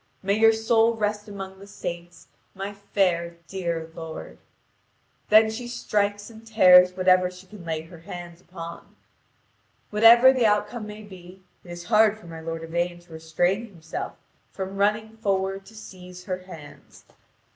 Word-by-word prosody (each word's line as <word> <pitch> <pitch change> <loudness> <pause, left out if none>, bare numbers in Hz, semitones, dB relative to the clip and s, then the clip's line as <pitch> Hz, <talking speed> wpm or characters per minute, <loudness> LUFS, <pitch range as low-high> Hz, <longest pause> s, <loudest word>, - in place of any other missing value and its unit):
May 195 +1 +1
your 225 0 +7
soul 225 +1 +2
rest 210 -1 -2
among 195 -2 -8
the 200 - -12
saints, 175 -3 -7 0.3
my 195 +2 -5
fair 180 -4 -1
dear 170 -4 -4
lord." 160 -1 -8 0.9
Then 220 +1 +6
she 240 +2 -6
strikes 205 -3 -1
and 220 -1 -13
tears 180 -5 +6
whatever 185 -1 +4
she 180 +1 -14
can 190 -1 -13
lay 160 -2 -3
her 165 +1 -14
hands 175 +1 -9
upon. 170 -2 -10 1.0
Whatever 235 +4 +7
the 245 -4 +3
outcome 210 +2 -1
may 210 +1 -9
be, 185 -1 -13 0.2
it 175 - -15
is 175 0 -7
hard 215 +3 +4
for 215 - -17
my 165 -1 -9
lord 165 0 -5
Yvain 175 +1 -2
to 175 -1 -17
restrain 175 +7 -1
himself 165 -6 -7 0.4
from 190 0 -6
running 215 +2 0
forward 195 -2 -1
to 220 - -15
seize 180 -4 -11
her 185 -1 -4
hands. 165 -6 -14
190 Hz, 155 wpm, -25 LUFS, 175-210 Hz, 1.0 s, your